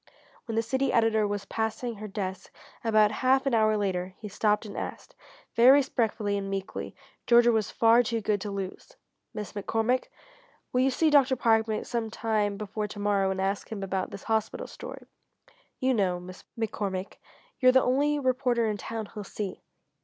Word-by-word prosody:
When 225 - -4
the 225 - +2
city 265 +3 0
editor 220 -2 +3
was 205 -1 -3
passing 220 +2 -3
her 215 +1 -6
desk 190 -2 -5 0.3
about 215 -2 +4
half 260 +4 +2
an 275 - +1
hour 215 -1 +3
later 185 -2 -2
he 215 - -8
stopped 210 +2 +1
and 205 - -8
asked, - - -6 0.4
very 235 +2 +6
respectfully 225 -7 +1
and 195 0 -5
meekly 195 -1 -5 0.3
Georgia 240 0 +6
was 220 -3 0
far 230 +1 +5
too 230 -1 -1
good 205 -2 0
to 210 - -4
lose: 195 -2 -6 0.4
"Miss 210 -1 -6
McCormick, 225 +4 0 0.7
will 250 - +3
you 265 - +4
see 310 +4 +2
Dr. 275 -2 +5
Parkman 225 -2 +2
some 230 -2 -2
time 215 -2 -1
before 210 +1 -4
to 205 - -10
morrow, 205 -1 +1
and 190 0 -2
ask 195 +3 -2
him 205 -3 -4
about 190 -1 -2
this - - -9
hospital 220 -1 -1
story? - - -9 0.7
You 260 0 +2
know, 185 -6 +1
Miss 185 +1 -11
McCormick, 200 -4 -3 0.4
you're 255 -1 +6
the 260 0 +4
only 285 +4 +2
reporter 255 -3 +1
in 210 -1 -1
town 225 0 -5
he'll 210 -2 -6
see." 200 -1 -6
220 Hz, 175 wpm, -28 LUFS, 200-240 Hz, 0.7 s, very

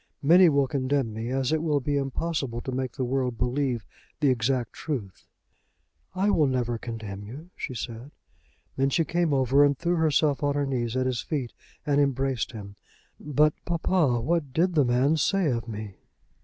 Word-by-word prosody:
Many 175 +4 +7
will 140 -2 +2
condemn 130 -3 -1
me, 110 +2 -4
as 130 +1 0
it 160 -1 +1
will 150 -3 +1
be 145 +2 -2
impossible 135 -2 -2
to 130 - -5
make 130 -1 -3
the 135 - -3
world 125 -1 -1
believe 125 -3 -1 0.3
the 145 -3 +3
exact 125 0 0
truth." 120 - -5 0.9
"I 195 +3 +2
will 155 -6 +3
never 120 -3 -1
condemn 110 -4 -6
you," 145 - -10
she 130 - -5
said. 115 +3 -6 0.7
Then 135 +1 +2
she 165 +4 +1
came 170 -1 0
over 135 +1 +4
and 140 -1 +3
threw 175 +3 0
herself 155 -2 +2
on 145 -1 +1
her 145 -1 +1
knees 125 -3 -2
at 130 - +1
his 125 -2 -1
feet, 135 -6 -3 0.3
and 145 -1 +3
embraced 135 -4 0
him. 100 -3 -9 0.4
"But, 150 +1 +2
papa, 165 -6 +1
what 155 +1 -1
did 175 +5 +2
the 150 -4 +3
man 130 +6 +2
say 175 +1 +2
of 115 -1 -3
me?" 105 -3 -7
135 Hz, 180 wpm, -26 LUFS, 120-150 Hz, 0.9 s, Many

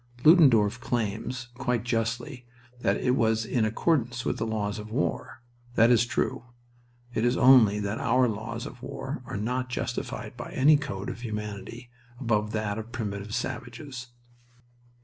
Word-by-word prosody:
Ludendorff 130 - +6
claims, 120 +2 -3
quite 125 -4 0
justly, 120 +2 -2 0.3
that - - +1
it 125 - +1
was 110 -3 +2
in 115 -1 +1
accordance 120 0 0
with - - 0
the 115 - -1
laws 105 -2 -2
of 105 +1 -8
war. 125 0 -2 0.3
That 115 +2 +6
is 120 0 +4
true. 120 - -1 0.7
It 110 - 0
is 120 +1 +2
only 120 -6 +6
that 100 +2 -2
our 125 +1 +3
laws 110 -1 -4
of - - -9
war - - -5
are - - -4
not 125 +4 -2
justified - - -4
by - - -8
any 150 +4 +6
code 120 -10 -3
of - - -9
humanity 105 +2 -6 0.3
above 105 -4 0
that 110 -1 -1
of 110 +2 -8
primitive 105 -3 -4
savages. 125 +1 -5
115 Hz, 150 wpm, -27 LUFS, 110-125 Hz, 0.7 s, Ludendorff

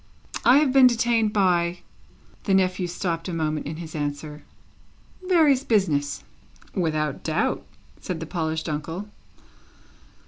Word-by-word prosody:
"I 250 +3 +6
have 290 -3 +3
been 265 -2 +8
detained 230 -2 +2
by" 180 -4 +1 0.6
the 195 - +3
nephew 185 -1 +1
stopped 170 -1 -3
a - - -4
moment 155 -2 -2
in 155 - -5
his 160 -1 -8
answer 150 0 -4 0.9
"various 305 -7 +4
business." 160 - 0 0.5
"Without 155 -5 -1
doubt," 165 +7 0 0.4
said 180 -4 -5
the 165 - -5
polished 160 -1 -3
uncle. 165 +6 -4
175 Hz, 125 wpm, -24 LUFS, 155-210 Hz, 0.9 s, been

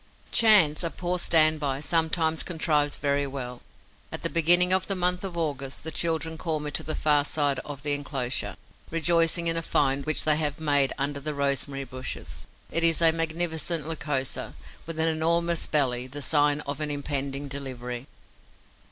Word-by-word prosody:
Chance, 200 -10 +5
a 170 - -1
poor 180 +1 -3
stand 155 -2 +4
by, 140 -2 -1
sometimes 160 +1 +1
contrives 150 -4 0
very 140 0 0
well. 125 -3 -6 0.5
At - - -5
the - - -1
beginning 175 +2 +4
of 190 - +2
the 195 - -1
month 180 0 0
of 185 -3 -6
August, 140 -4 -3
the 160 - -4
children 160 -1 -1
call 160 -3 -1
me 150 0 -4
to - - -1
the 155 - -3
far 150 -1 +2
side 145 -2 0
of 140 0 -8
the 145 -1 +2
enclosure, 140 -3 -2 0.3
rejoicing 165 +1 +2
in 165 0 +1
a 165 - +1
find 140 -2 0
which 155 - +2
they 155 -1 +4
have 150 -2 -2
made 145 -3 +2
under 140 +1 -2
the 150 +1 -4
rosemary 140 0 -1
bushes. 130 -1 -6 0.2
It 165 - +1
is 165 -1 +6
a 165 -1 +7
magnificent 165 0 -1
Lycosa, 145 -5 -3 0.3
with 165 -1 -6
an 160 - +3
enormous 170 +1 +1
belly, 130 -4 +1
the 140 +2 -7
sign 145 0 +2
of 140 0 -5
an 150 - -1
impending 140 -1 -3
delivery. 130 -2 -6
150 Hz, 175 wpm, -26 LUFS, 140-165 Hz, 0.5 s, a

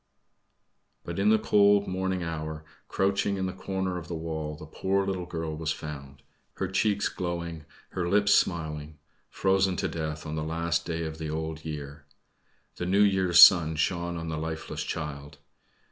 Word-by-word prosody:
But - - -5
in 100 +2 +3
the 110 - +6
cold 100 -1 +4
morning 95 -1 -1
hour, 80 -1 -5 0.2
crouching 100 +1 0
in 95 - -1
the 95 - -3
corner 95 -2 -3
of 85 - -11
the 85 - -4
wall, 80 -2 -4
the 75 - -10
poor 95 +5 -1
little 95 -2 -3
girl 80 -2 -4
was 80 0 -2
found 70 -3 -8 0.3
her 95 - -2
cheeks 100 +2 +1
glowing, 85 -3 -4 0.2
her 85 -1 -2
lips 100 +1 +4
smiling 75 -3 0 0.3
frozen 95 -1 +2
to - - -1
death 80 -1 -4
on 75 - -5
the 80 - -2
last 85 +2 -1
night 85 0 -2
of 80 0 -5
the 80 -1 -4
Old 80 0 -4
Year. 75 -1 -7 0.7
The 90 - -3
New 100 +3 +4
Year's 95 -3 +3
sun 85 -4 +9
shone 85 +2 -1
on 80 0 -5
the 80 -1 -3
lifeless 80 0 -4
child. 75 -3 -5
85 Hz, 170 wpm, -28 LUFS, 80-95 Hz, 0.7 s, sun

